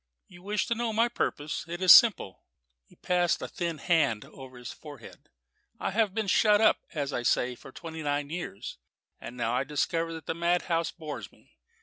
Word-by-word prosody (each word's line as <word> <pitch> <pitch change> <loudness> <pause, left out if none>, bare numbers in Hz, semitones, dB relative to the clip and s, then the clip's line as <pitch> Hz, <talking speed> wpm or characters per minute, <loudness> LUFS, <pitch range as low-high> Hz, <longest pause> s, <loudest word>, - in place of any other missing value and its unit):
"You 175 -1 -15
wish 205 +2 -1
to - - 0
know 235 0 -2
my 225 +2 +3
purpose? 150 -10 -3
It 170 +1 -5
is 185 -2 +6
simple." 205 - +6 0.5
He - - -22
passed 175 -1 +1
a - - -5
thin 170 -2 -4
hand 150 - +1
over 130 -2 -12
his 120 0 -8
forehead. 145 -7 -13 0.5
"I - - -2
have 210 -1 +1
been 220 -1 0
shut 205 +2 +4
up, 220 - +4 0.2
as 145 -2 -2
I - - -1
say, 125 +1 +1
for 125 - -13
twenty 160 +3 -8
nine 145 -1 -2
years, 165 - -6 0.4
and 125 +1 -9
I 120 - 0
now - - 0
discover 165 +4 -1
that 160 - -9
the - - -2
madhouse 170 0 0
bores 155 -4 -8
me. - - -26
165 Hz, 195 wpm, -28 LUFS, 145-185 Hz, 0.5 s, is